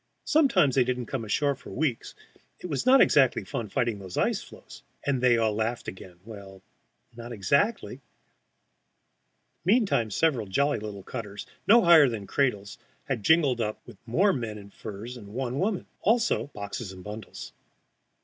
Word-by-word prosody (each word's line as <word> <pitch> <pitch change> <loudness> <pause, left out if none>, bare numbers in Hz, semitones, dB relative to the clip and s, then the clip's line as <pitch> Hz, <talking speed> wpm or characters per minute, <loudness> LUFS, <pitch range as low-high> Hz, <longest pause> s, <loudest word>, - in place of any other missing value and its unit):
Sometimes 225 - +3
they 130 - +4
didn't 125 0 -2
come 130 0 -4
ashore 140 +7 +1
for 135 - -13
weeks; 135 -5 -2 0.4
it - - -10
was 165 - -3
not 265 +1 +7
exactly 135 -4 +4
fun 120 -7 -5
fighting 115 0 -1
those 95 -2 -8
ice - - +1
floes. - - -14 0.2
And 135 -3 0
they 125 -2 +4
all 110 -2 +1
laughed 110 +3 -2
again; 95 -1 -9
well, 100 -3 -11 0.5
not 120 +1 -9
exactly! 140 - 0 1.6
Meantime 195 - +2
several 125 -1 +1
jolly 140 +6 +1
little 105 -2 -7
cutters, 105 -2 -7 0.2
no 230 +2 +7
higher 160 -5 +7
than 110 -4 -5
cradles, 105 -6 -1 0.2
had - - -3
jingled 140 -1 +3
up 110 -1 -3
with 120 -5 -13
more 190 - +3
men 115 -4 -4
in 100 -1 -12
furs 110 +5 -8
and 105 -2 -12
one 130 +1 -2
woman. 195 +1 -1 0.2
Also 230 - +2
boxes 100 -4 -6
and 95 -1 -11
bundles. 105 +1 -9
120 Hz, 160 wpm, -27 LUFS, 105-145 Hz, 1.6 s, not